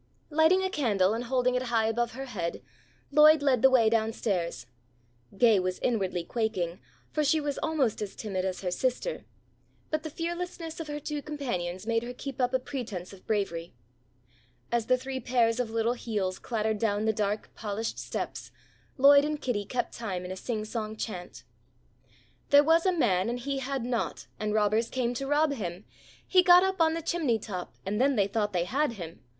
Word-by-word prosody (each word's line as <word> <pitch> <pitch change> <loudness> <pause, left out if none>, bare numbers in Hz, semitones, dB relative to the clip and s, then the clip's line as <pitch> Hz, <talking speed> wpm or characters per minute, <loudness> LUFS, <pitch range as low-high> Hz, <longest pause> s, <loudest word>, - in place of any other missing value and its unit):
Lighting 320 +5 +4
a 375 - 0
candle 210 - +2
and 235 +2 -3
holding 250 0 +1
it 250 - +1
high 230 -3 +1
above 235 +1 0
her 270 +3 -6
head, 180 -10 -4 0.5
Lloyd 300 0 +7
led 260 -5 +3
the 265 - +7
way 250 -4 +5
down 225 0 +2
stairs. 175 - -2 0.7
Gay 225 -4 +5
was 185 0 -1
inwardly 190 -7 -1
quaking, 190 -5 -2 0.3
for 305 - 0
she 310 +2 +3
was 290 -2 -3
almost 275 -10 0
as 205 -2 -5
timid 195 -4 -3
as 185 -1 -3
her 180 -2 -2
sister, 255 - -2 0.7
but 310 0 0
the 315 - -6
fearlessness 340 0 -5
of 325 - -5
her 295 0 -4
two 295 0 -4
companions 200 -12 -4
made 230 0 +1
her 245 +1 -7
keep 270 0 -5
up 250 0 +2
a 260 - +3
pretence 240 -9 -6
of 190 - -16
bravery. 170 - -2 1.0
As 235 -1 0
the 255 0 +4
three 260 +1 -5
pairs 235 -1 +2
of 245 -3 -1
little 230 +1 +1
heels 205 -6 -3
clattered 220 -2 -1
down 210 -1 0
the 220 - +2
dark 210 0 -2
polished 220 +1 -4
steps, - - -5 0.5
Lloyd 280 +1 +7
and 300 0 -2
Kitty 225 -8 -2
kept 245 +4 -2
time 190 -6 -4
in 180 - -6
a - - -4
singsong 215 +1 -4
chant: 180 -5 -6 1.1
"There 285 0 +7
was 330 +4 +4
a - - +5
man 195 - +2
and 240 - -2
he 275 +2 -3
had 265 -2 -3
naught 245 -2 -2
And 215 0 -1
robbers 215 +2 +2
came 245 -2 -1
to 270 +3 -4
rob 295 +1 +3
him. 185 -5 -5 0.4
He 370 - +6
got 360 0 +7
up 380 -2 0
on 320 0 +4
the 330 - -4
chimney 305 -9 +1
top 190 -4 -6
And 210 +4 -1
then 275 +1 +3
they 200 -3 +3
thought 205 +1 -1
they 175 -2 0
had 275 +5 0
him. 170 -6 -9
235 Hz, 190 wpm, -28 LUFS, 205-280 Hz, 1.1 s, Lloyd